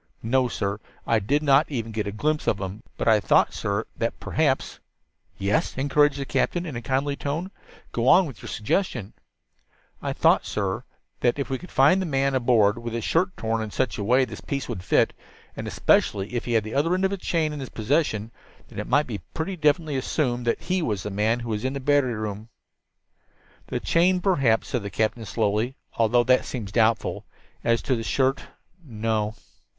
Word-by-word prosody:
"No, 125 +3 +2
sir, 100 -3 -2 0.3
I - - +3
did 145 +9 0
not 140 +2 +4
even 115 -6 -3
get 105 -1 -2
a - - -2
glimpse 150 +9 -1
of 100 - +2
him. 95 +2 -5 0.2
But - - -2
I 110 -1 +6
thought, - - +3
sir, 100 +2 -2
that 115 - -2
perhaps 145 -4 0 0.3
" - - -49 0.3
"Yes," 100 +5 0
encouraged 145 +1 +3
the 140 - -3
captain 170 +7 0
in 150 -7 -6
a 120 - -4
kindly 135 +4 0
tone. 155 +7 -3 0.4
"Go 120 +1 -1
on 185 +6 +7
with 135 -8 -9
your - - -8
suggestion." 110 - -1 0.9
"I - - -2
thought, - - +3
sir," 105 - -3
Joe 95 -1 0 0.5
continued, 120 - +2
"that - - -9
if 140 - -2
we 130 - -1
could 180 - -11
find 150 +8 +4
a 185 - -2
man 135 -2 +1
aboard 120 -4 +3
with 115 -1 -5
his 115 -1 -2
shirt 180 +3 +1
torn 115 0 -1
in 110 - -4
such 120 0 -1
a - - -2
way 125 +5 +4
that - - -14
this - - -8
piece 140 -1 -3
would 90 - -5
fit, - - +3 0.4
and - - -5
especially 100 +2 +1
if 120 - -2
he 120 - -2
had 110 -2 +3
the 110 - -7
other 165 +6 +2
end 190 +1 +1
of 190 - +1
this 200 - -3
chain 160 -4 0
in 150 - -5
his 130 - -6
possession, 115 -2 0 0.4
then - - -8
it - - -4
might 145 +4 +3
be 110 -5 -5 0.2
pretty 170 +4 -2
definitely 150 -2 +1
assumed 125 -3 -1
that 115 - +1
he 185 0 -1
was 105 - -2
the 105 - -4
man 110 +4 +1
who 120 - -6
was 105 -1 -2
in 130 +1 -1
the 140 - -3
battery 135 -3 +2
room." 105 0 -5 1.2
"The - - -2
chain 180 +2 +3
perhaps," 135 - +2
said 125 -4 -1
the 100 - -5
captain 110 +2 -1
slowly, 110 +5 0 0.2
"although 115 +1 +3
that 130 +2 +3
seems 110 -6 -5
doubtful. 110 0 +1 0.4
As 115 0 +2
to 130 - +1
the 115 - -3
shirt, 130 +3 +1 0.4
no." 110 -4 -2
125 Hz, 210 wpm, -25 LUFS, 110-145 Hz, 1.2 s, on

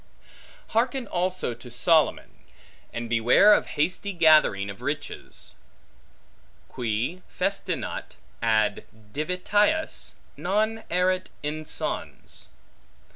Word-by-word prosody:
Harken 245 +3 0
also 185 - -1
to 125 - -12
Solomon, 160 +6 +2 0.5
and 120 0 -4
beware 120 - +6
of - - +2
hasty 180 +6 0
gathering 155 - +5
of 100 0 -8
riches; - - -5 1.2
Qui 120 +9 -2
festinat 195 +2 -3 0.3
ad 110 -3 +1 0.3
divitias, 205 - 0 0.2
non 215 +4 0
erit 185 +1 +1
insons. 155 +1 -4
175 Hz, 80 wpm, -26 LUFS, 120-200 Hz, 1.2 s, beware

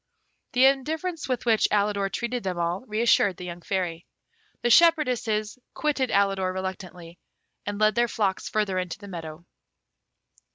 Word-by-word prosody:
The 255 +1 +5
indifference 310 +5 0
with 250 -2 -2
which 225 -2 +3
Alidor 200 -1 +1
treated 240 +1 -3
them 185 -3 -3
all 170 +2 -1
re 215 +1 -2
assured 205 -5 +3
the 180 - -7
young 175 0 -7
Fairy. 175 -3 -3 0.6
The 240 - +2
shepherdesses 250 -8 +3 0.2
quitted 280 -4 0
Alidor 195 -2 +1
reluctantly, 185 -2 -7 0.5
and 205 0 -3
led 215 0 +3
their 240 0 +2
flocks 200 -4 -1
further 205 -3 0
into 180 -2 -4
the 205 0 -12
meadow. 165 -2 -8
205 Hz, 150 wpm, -26 LUFS, 185-240 Hz, 0.6 s, The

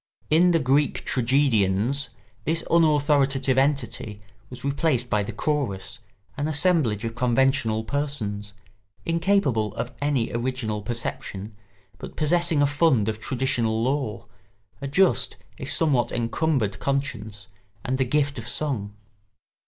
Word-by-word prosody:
In 170 +4 +5
the 170 - +4
Greek 140 0 +1
tragedians 125 -1 +1 0.3
this 165 +1 -1
unauthoritative 145 -4 +3
entity 135 -6 -1 0.3
was 125 - -10
replaced 140 -3 0
by 105 -2 +3
the 100 - -4
chorus, 120 -4 -2 0.4
an 145 +1 -1
assemblage 150 - +1
of 115 - -3
conventional 120 -2 +1
persons, 110 -7 -3 0.5
incapable 165 - +1
of 115 +2 -3
any 145 -5 0
original 120 -3 -2
perception, 105 -2 -5 0.4
but - - -9
possessing 165 -1 +2
a - - +5
fund 140 -7 +2
of 110 0 -4
traditional 115 -2 0
lore, 130 -4 -1 0.6
a 140 - -3
just 185 +8 +2 0.2
if - - -4
somewhat 145 -8 +2
encumbered 115 -4 0
conscience, 115 -7 -3 0.4
and 130 +1 -1
the - - +4
gift 140 0 0
of 115 - -7
song. 120 -7 -2
130 Hz, 120 wpm, -25 LUFS, 110-145 Hz, 0.6 s, In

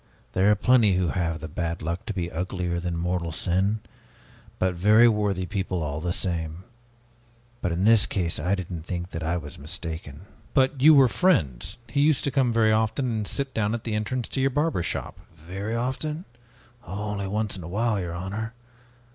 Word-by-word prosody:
There 95 +2 +4
are 105 - +6
plenty 110 -2 +4
who 90 -2 +1
have 80 -3 -1
the 80 - -5
bad 85 +1 -3
luck 85 +7 -3
to 110 - -2
be 85 -2 -2
uglier 90 0 -2
than 85 -1 -3
mortal 85 -1 -1
sin, 95 +6 0 0.8
but 95 0 +1
very 105 +6 +6
worthy 105 -4 +1
people 95 -2 -2
all 75 +1 -3
the 90 +1 -1
same. 85 -1 -3 1.0
But 90 - 0
in 85 +3 0
this 110 0 +5
case 85 -5 -1
I 90 +6 +1
didn't 90 -3 -5
think 85 +1 -4
that 80 - -4
I 85 +2 0
was 75 -5 -8
mistaken." 80 -1 -6 0.3
"But 130 -1 +3
you 155 +2 +8
were 135 -2 +7
friends. 100 - +1
He 130 +5 0
used 150 -1 +3
to 140 - 0
come 130 -2 +2
very 115 -1 +4
often 110 +4 +1
and 110 -2 -2
sit 140 -2 -3
down 110 0 0
at 115 - -6
the 115 - -3
entrance 110 +3 -1
to 135 - -2
your 135 - +3
barber 150 - 0
shop." - - -4 0.2
"Very 95 +7 -5
often? 150 +8 -2 0.6
Only 100 -1 -4
once 105 +1 -1
in 95 - -7
a 80 - -7
while, 110 +2 +1
your 85 -1 -4
honor! 105 +6 -4
95 Hz, 190 wpm, -26 LUFS, 85-115 Hz, 1.0 s, you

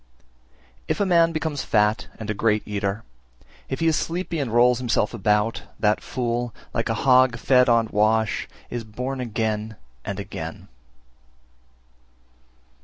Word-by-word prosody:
325. - - -19
If - - 0
a 205 - +2
man 170 -3 +4
becomes 155 -3 -2
fat 105 0 +1
and 110 - -6
a - - -1
great 105 0 +1
eater, 100 0 -2 0.7
if 130 - -3
he - - +2
is 160 -1 +3
sleepy 170 0 -2
and 135 -5 -2
rolls 120 +1 +4
himself 120 -3 0
about, 105 +1 +1 0.2
that 105 0 +2
fool, 120 -2 -2 0.2
like 115 - -1
a 115 - +1
hog 130 -2 +5
fed 125 +1 +4
on 115 -1 +4
wash, 110 +1 +1 0.2
is 120 -1 -3
born 125 +5 -5
again 110 -2 -2 0.3
and - - -4
again. - - -7
115 Hz, 145 wpm, -24 LUFS, 110-130 Hz, 0.7 s, hog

